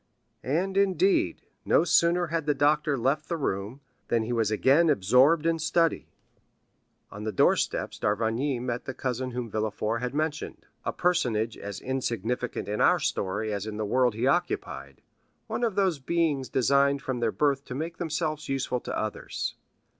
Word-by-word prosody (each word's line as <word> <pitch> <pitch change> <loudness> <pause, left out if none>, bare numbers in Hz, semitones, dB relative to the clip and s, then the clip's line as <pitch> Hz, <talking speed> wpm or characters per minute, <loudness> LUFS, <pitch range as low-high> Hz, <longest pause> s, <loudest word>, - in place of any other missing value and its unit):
And, 185 +8 -1
indeed, 325 - +2 0.2
no - - +4
sooner 170 +1 +3
had 165 -3 -1
the 150 - +2
doctor 150 0 +2
left 135 +5 0
the 170 - -1
room, 110 -1 -3 0.3
than 115 -1 +1
he 120 +2 -3
was 115 -3 +1
again 135 +10 +4
absorbed 135 - +4
in 165 0 +2 0.2
work. 165 -2 +5 1.2
On 100 - -8
the 110 - -2
doorsteps 95 - +1
d'Avrigny 115 +6 0
met 120 0 -3
the 130 - -5
cousin 130 0 -2
whom 125 -1 -4
Villefort 110 +1 -1
had 125 +2 -3
mentioned, 155 0 -3 0.2
a - - 0
personage 115 -11 0
as 100 -1 -7
insignificant 125 -2 -2
in 105 +1 -2
our - - +5
story 105 +3 -2
as 100 +1 -3
in 105 -1 -5
the 110 - -2
world 125 +1 +2
he 115 +3 -1
occupied—one 180 - -3
of 225 -5 0
those 190 -7 +1
beings 150 -2 0
designed 140 +2 +2
from 130 -2 -2
their 115 -2 +1
birth 140 0 +1
to 125 - -6
make 165 +4 -4
themselves 155 -3 -3
useful 135 -2 -1
to - - -5
others. 110 -1 -3
135 Hz, 160 wpm, -27 LUFS, 115-160 Hz, 1.2 s, work